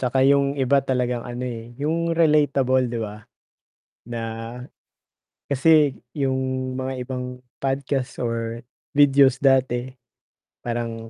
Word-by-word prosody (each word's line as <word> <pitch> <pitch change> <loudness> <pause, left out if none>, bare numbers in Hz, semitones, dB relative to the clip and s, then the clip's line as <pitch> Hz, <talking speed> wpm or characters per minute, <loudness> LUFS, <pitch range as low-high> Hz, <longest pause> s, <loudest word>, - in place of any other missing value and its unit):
Tsaka 130 +1 +2
yung 140 0 +3
iba 140 +1 +3
talagang 125 -3 -1
ano, 120 +1 -5
eh, 120 -1 -7
yung 165 +4 -1
relatable 140 -5 +3
‘di 120 0 -3
ba, 105 -1 -5 0.9
na 120 -1 -4 1.3
kasi 145 0 +4 0.2
yung 130 -2 -1
mga 130 0 -3
ibang 125 -1 -5 0.2
podcast 135 -1 -2
or 115 -1 -2 0.3
videos 140 -3 +5
dati, 130 -3 +2 0.8
parang 115 -1 -4
130 Hz, 110 wpm, -23 LUFS, 120-140 Hz, 1.3 s, videos